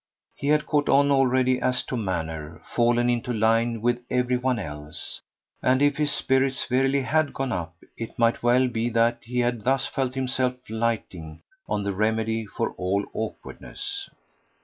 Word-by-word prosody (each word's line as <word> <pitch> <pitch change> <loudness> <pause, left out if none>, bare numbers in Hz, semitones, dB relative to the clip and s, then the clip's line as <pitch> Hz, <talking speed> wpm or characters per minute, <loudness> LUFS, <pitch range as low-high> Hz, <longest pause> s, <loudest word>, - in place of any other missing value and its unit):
He 140 - -5
had 150 +1 +3
caught 145 -1 +1
on 140 +1 +5
already 130 -1 +3
as 125 -1 +1
to - - -4
manner 80 -7 -3
fallen 120 0 +2
into 120 +1 0
line 115 0 +2
with 120 0 +1
every 125 0 +1
one 125 0 0
else; 75 -5 -6 0.4
and 130 +1 +3
if 145 0 +3
his 150 -1 +1
spirits 135 -1 +1
verily 135 +2 +2
HAD 155 +3 +1
gone 135 -1 -2
up 85 -5 -3 0.2
it 115 - -7
might 115 0 +2
well 125 +2 +4
be 115 -1 -1
that 115 0 +2
he 125 +2 -1
had 120 -2 0
thus 135 +2 +2
felt 130 -2 -2
himself 130 -1 0 0.2
lighting 110 -9 -3 0.3
on 105 - 0
the 100 0 -1
remedy 110 +2 0
for - - -2
all 95 +2 0
awkwardness. 400 - -5
120 Hz, 165 wpm, -25 LUFS, 110-130 Hz, 0.4 s, on